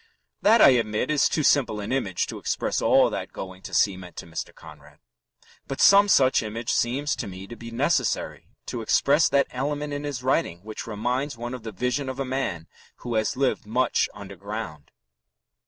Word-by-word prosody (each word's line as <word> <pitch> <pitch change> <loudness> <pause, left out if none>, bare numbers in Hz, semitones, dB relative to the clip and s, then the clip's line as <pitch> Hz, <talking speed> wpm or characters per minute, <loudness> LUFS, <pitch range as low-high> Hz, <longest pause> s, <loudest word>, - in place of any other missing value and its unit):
That, 220 +2 +5
I - - +9
admit, 115 +1 +1
is 150 - +3
too 155 - 0
simple 130 -7 +3
an 100 +2 -5
image 105 -9 0
to - - -7
express - - -1
all - - +4
that - - -5
going 95 0 -8
to - - -9
sea 100 -3 +2
meant 90 -2 -11
to - - -7
Mr. 85 0 -6
Conrad. 75 -1 -15 0.7
But 135 - -5
some 200 +1 +7
such 135 -9 +4
image 115 +2 -3
seems 135 +5 0
to - - -4
me 95 0 -8
to 120 - -10
be 115 0 -9
necessary 115 - -1 0.2
to 120 - -5
express 145 +7 +3
that 140 0 +3
element 145 +3 -3
in 145 0 -4
his 140 -4 -4
writing 130 - 0
which 110 +1 -7
reminds 125 +5 -2
one 120 +2 -5
of 125 - -6
the 110 0 -7
vision 125 +6 -2
of 130 +1 -6
a 135 - -1
man 125 -11 -3 0.4
who 120 - -3
has 110 +4 0
lived 135 -5 0
much 125 +3 +1
underground. 100 -5 -8
120 Hz, 190 wpm, -25 LUFS, 105-135 Hz, 0.7 s, I